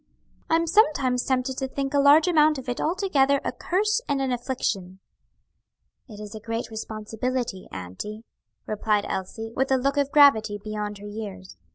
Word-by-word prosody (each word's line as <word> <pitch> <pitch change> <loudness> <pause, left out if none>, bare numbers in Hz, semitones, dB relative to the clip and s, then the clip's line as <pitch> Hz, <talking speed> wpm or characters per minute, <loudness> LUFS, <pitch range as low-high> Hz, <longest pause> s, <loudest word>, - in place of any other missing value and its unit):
"I'm 330 +1 +3
sometimes 300 - +3
tempted 260 0 -1
to 265 - -2
think 275 +1 -3
a 285 - +3
large 290 +4 +6
amount 310 -3 +4
of 265 0 -8
it 245 - -2
altogether 300 -6 +2
a - - 0
curse 420 +5 0
and 280 -1 +1
an 265 -1 -1
affliction." 220 -7 -3 1.1
"It 210 -2 -10
is 210 0 -8
a 220 - -7
great 230 +2 -4
responsibility, 220 0 -4
auntie," 95 - -7 0.4
replied 210 -1 0
Elsie, 225 +4 -5
with 265 +1 0
a 265 - +5
look 275 +3 0
of 285 -1 +1
gravity 225 -8 +5
beyond 210 0 -5
her 205 +1 -10
years. 205 -3 -8
250 Hz, 165 wpm, -25 LUFS, 210-280 Hz, 1.1 s, large